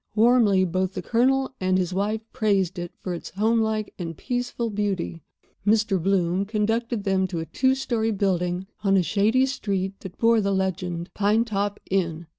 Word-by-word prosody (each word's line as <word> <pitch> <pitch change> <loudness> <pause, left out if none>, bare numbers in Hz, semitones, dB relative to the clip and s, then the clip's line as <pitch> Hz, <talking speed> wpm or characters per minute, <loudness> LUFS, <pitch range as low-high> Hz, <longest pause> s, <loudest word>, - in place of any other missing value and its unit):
Warmly 220 -4 +4
both 185 +1 -1
the 185 - -5
Colonel 265 +5 +2
and 185 0 +2
his 185 -1 -1
wife 210 +3 -1
praised 195 -4 +1
it 175 0 -5
for 180 - -5
its 170 - -6
homelike 220 +1 0
and 165 -3 -5
peaceful 245 -2 -2
beauty. 195 -5 -2 0.4
Mr. 210 -2 +2
Bloom 185 0 +1
conducted 220 +1 -1
them 190 -2 +1
to 175 -2 -5
a 160 - -4
two 260 +8 +1
story 235 -4 -1
building 185 -3 0 0.2
on 195 -1 +4
a 185 - +3
shady 220 +8 +2
street 195 -7 -2
that 190 -1 -10
bore 230 -1 +4
the 200 -1 0
legend, 180 -2 -2
"Pine 210 +3 +2
top 205 -2 -2
Inn." 170 -3 0
200 Hz, 170 wpm, -24 LUFS, 185-220 Hz, 0.4 s, Warmly